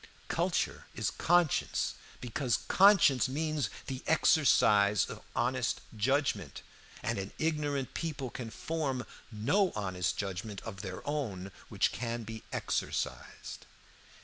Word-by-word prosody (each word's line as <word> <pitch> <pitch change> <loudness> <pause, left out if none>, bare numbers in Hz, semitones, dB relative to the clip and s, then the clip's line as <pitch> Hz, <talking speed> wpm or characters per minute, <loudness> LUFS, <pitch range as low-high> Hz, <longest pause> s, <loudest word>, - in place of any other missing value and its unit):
Culture - - 0
is - - -1
conscience, 175 -3 +2 0.3
because 125 0 0
conscience 185 - +6
means 150 -3 -1 0.2
the 130 -1 -5
exercise 105 - +5
of - - -8
honest 125 0 0
judgment, 110 - 0 0.4
and - - -1
an 95 +1 -5
ignorant 145 -4 -1
people 140 -6 -3
can 120 -3 -6
form 135 -1 -2 0.3
no 145 - +2
honest 95 -4 -1
judgment 100 +1 -4
of 100 -4 -7
their 95 +3 -7
own 105 -11 -3 0.2
which - - +2
can 115 0 -3
be 110 0 -7
exercised. - - -3
125 Hz, 115 wpm, -32 LUFS, 105-150 Hz, 0.4 s, conscience